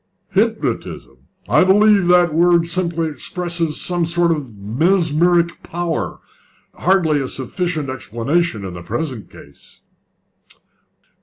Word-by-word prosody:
"Hypnotism! 215 Hz, +3 st, -2 dB, 0.3 s
I -, -, +4 dB
believe 200 Hz, 0 st, +4 dB
that 180 Hz, -1 st, +5 dB
the -, -, -8 dB
word 170 Hz, 0 st, +4 dB
simply 170 Hz, -1 st, -2 dB
expresses 170 Hz, +2 st, -3 dB
some 175 Hz, -1 st, +1 dB
sort 170 Hz, +1 st, +2 dB
of 135 Hz, -9 st, -4 dB
mesmeric 170 Hz, -, +1 dB
power 170 Hz, -1 st, -3 dB, 0.6 s
hardly 170 Hz, -5 st, +2 dB
a 135 Hz, -, -3 dB
sufficient 155 Hz, +4 st, -3 dB
explanation 130 Hz, -, -2 dB
in 95 Hz, -, -6 dB
the 85 Hz, -, -8 dB
present 120 Hz, -, -5 dB
case." 70 Hz, -, -17 dB
170 Hz, 110 wpm, -19 LUFS, 140-175 Hz, 0.6 s, that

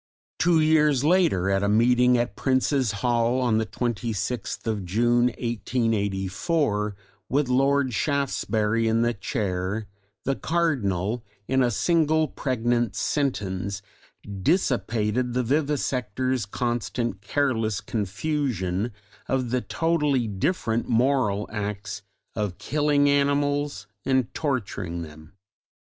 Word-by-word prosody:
Two 170 Hz, -1 st, +4 dB
years 150 Hz, -3 st, +3 dB
later 160 Hz, -, +3 dB
at 95 Hz, 0 st, +2 dB
a 100 Hz, -, +1 dB
Meeting 125 Hz, +3 st, +4 dB
at 120 Hz, 0 st, -1 dB
Prince's 130 Hz, -2 st, +1 dB
Hall 120 Hz, +1 st, +2 dB
on 120 Hz, -4 st, +2 dB
the 110 Hz, -, -1 dB
26th 120 Hz, -1 st, -3 dB
of 110 Hz, -3 st, -1 dB
June, 120 Hz, +6 st, +2 dB
1884, 105 Hz, -, -1 dB, 0.3 s
with 140 Hz, +1 st, +1 dB
Lord 135 Hz, 0 st, +2 dB
Shaftesbury 115 Hz, -4 st, 0 dB
in 115 Hz, +1 st, +2 dB
the 120 Hz, 0 st, +1 dB
Chair, 100 Hz, -2 st, -2 dB, 0.4 s
the 135 Hz, -, +1 dB
Cardinal 120 Hz, -, 0 dB, 0.2 s
in 130 Hz, 0 st, +2 dB
a 125 Hz, -, +3 dB
single 160 Hz, -, +2 dB
pregnant 120 Hz, -5 st, -1 dB
sentence 100 Hz, -9 st, -2 dB, 0.6 s
dissipated 120 Hz, -, +1 dB
the 125 Hz, -, +2 dB
vivisectors' 130 Hz, -4 st, -1 dB
constant 120 Hz, -3 st, -2 dB
careless 110 Hz, -3 st, 0 dB
confusion 105 Hz, -, -2 dB, 0.4 s
of 130 Hz, -3 st, -1 dB
the 125 Hz, 0 st, +1 dB
totally 150 Hz, -8 st, +1 dB
different 110 Hz, -, -1 dB
moral 120 Hz, -4 st, +2 dB
acts 105 Hz, -1 st, -4 dB, 0.3 s
of 105 Hz, -5 st, -2 dB
killing 145 Hz, -1 st, +2 dB
animals 145 Hz, -4 st, +1 dB, 0.2 s
and 130 Hz, -2 st, +1 dB
torturing 100 Hz, -, -2 dB
them. 80 Hz, +3 st, -13 dB
120 Hz, 105 wpm, -25 LUFS, 105-140 Hz, 0.6 s, Two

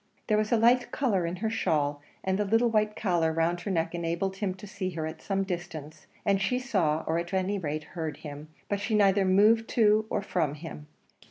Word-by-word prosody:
There 215 Hz, -, +2 dB
was 215 Hz, 0 st, -1 dB
a 235 Hz, -, +5 dB
light 245 Hz, +2 st, +4 dB
colour 195 Hz, -11 st, +1 dB
in 170 Hz, -, -3 dB
her 220 Hz, +4 st, -2 dB
shawl, 145 Hz, -8 st, 0 dB, 0.2 s
and 190 Hz, +1 st, 0 dB
the -, -, +3 dB
little 225 Hz, +3 st, +2 dB
white 215 Hz, -1 st, +1 dB
collar 175 Hz, -5 st, +1 dB
round 165 Hz, +2 st, 0 dB
her 200 Hz, -, -4 dB
neck 165 Hz, -3 st, 0 dB
enabled 170 Hz, +3 st, -2 dB
him 190 Hz, -2 st, -2 dB
to 190 Hz, -, -11 dB
see 195 Hz, -2 st, -4 dB
her 160 Hz, -3 st, -4 dB
at 160 Hz, +1 st, -6 dB
some 195 Hz, -1 st, -1 dB
distance; 175 Hz, -5 st, -6 dB, 0.2 s
and 195 Hz, -1 st, +2 dB
she 225 Hz, +6 st, +1 dB
saw, 185 Hz, -, 0 dB
or 165 Hz, +1 st, 0 dB
at 170 Hz, +3 st, -4 dB
any 190 Hz, +2 st, 0 dB
rate 155 Hz, -2 st, -3 dB
heard 160 Hz, -2 st, -5 dB
him, 145 Hz, +1 st, -7 dB, 0.2 s
but 205 Hz, -, -1 dB
she 215 Hz, +2 st, -1 dB
neither 200 Hz, -1 st, +4 dB
moved 215 Hz, +5 st, +4 dB
to 215 Hz, -1 st, +3 dB
or -, -, -1 dB
from 160 Hz, -6 st, -1 dB
him. 150 Hz, -1 st, -9 dB
190 Hz, 220 wpm, -28 LUFS, 165-210 Hz, 0.2 s, a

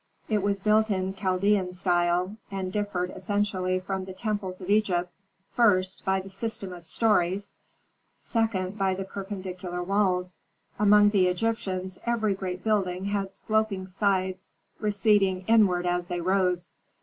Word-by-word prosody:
It 210 Hz, -2 st, +1 dB
was 200 Hz, 0 st, 0 dB
built 215 Hz, +2 st, +3 dB
in 190 Hz, -1 st, -1 dB
Chaldean 190 Hz, 0 st, +1 dB
style, 180 Hz, +1 st, +1 dB
and 190 Hz, -2 st, -4 dB
differed 195 Hz, -4 st, -1 dB
essentially 185 Hz, -1 st, 0 dB
from 190 Hz, 0 st, -4 dB
the 190 Hz, -, -8 dB
temples 205 Hz, -3 st, -3 dB
of 185 Hz, -, -8 dB
Egypt, 190 Hz, -4 st, +1 dB, 0.4 s
first, 190 Hz, -5 st, +2 dB
by 190 Hz, -1 st, +1 dB
the 190 Hz, +1 st, -8 dB
system 195 Hz, -2 st, -5 dB
of 170 Hz, -2 st, -10 dB
stories, 200 Hz, -1 st, +1 dB, 0.6 s
second, 210 Hz, -4 st, -1 dB
by 190 Hz, -1 st, +2 dB
the 195 Hz, -, -3 dB
perpendicular 185 Hz, -2 st, -5 dB
walls. 185 Hz, -2 st, 0 dB, 0.4 s
Among 210 Hz, 0 st, +6 dB
the 190 Hz, -3 st, +4 dB
Egyptians 185 Hz, -1 st, -2 dB
every 225 Hz, -3 st, +1 dB
great 185 Hz, -1 st, -5 dB
building 190 Hz, -4 st, 0 dB
had 200 Hz, -1 st, -1 dB
sloping 215 Hz, -2 st, -1 dB
sides 190 Hz, -1 st, -1 dB, 0.3 s
receding 205 Hz, -3 st, +2 dB
inward 200 Hz, -6 st, +4 dB
as 175 Hz, 0 st, 0 dB
they 175 Hz, 0 st, -3 dB
rose. 180 Hz, -1 st, +1 dB
190 Hz, 135 wpm, -27 LUFS, 185-205 Hz, 0.6 s, Among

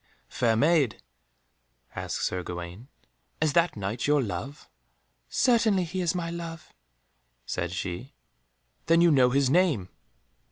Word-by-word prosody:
"Fair 115 Hz, -3 st, +1 dB
Maid," 145 Hz, -1 st, +2 dB, 0.9 s
asked -, -, -4 dB
Sir 90 Hz, -, -1 dB
Gawaine, 90 Hz, +6 st, -7 dB, 0.5 s
"is 155 Hz, -2 st, +1 dB
that 170 Hz, +2 st, +3 dB
Knight 105 Hz, +5 st, -3 dB
your 150 Hz, 0 st, +4 dB
love?" 135 Hz, +6 st, -6 dB, 0.6 s
"Certainly 225 Hz, -7 st, +3 dB
he 185 Hz, +2 st, -3 dB
is 175 Hz, 0 st, 0 dB
my 170 Hz, -2 st, -3 dB
love," 165 Hz, -2 st, -7 dB, 0.7 s
said 85 Hz, +6 st, -3 dB
she. 90 Hz, +8 st, -5 dB, 0.7 s
"Then 165 Hz, +1 st, +5 dB
you 170 Hz, -1 st, +5 dB
know 130 Hz, -4 st, +5 dB
his 135 Hz, 0 st, +2 dB
name?" 150 Hz, -, +2 dB
145 Hz, 125 wpm, -27 LUFS, 110-170 Hz, 0.9 s, Then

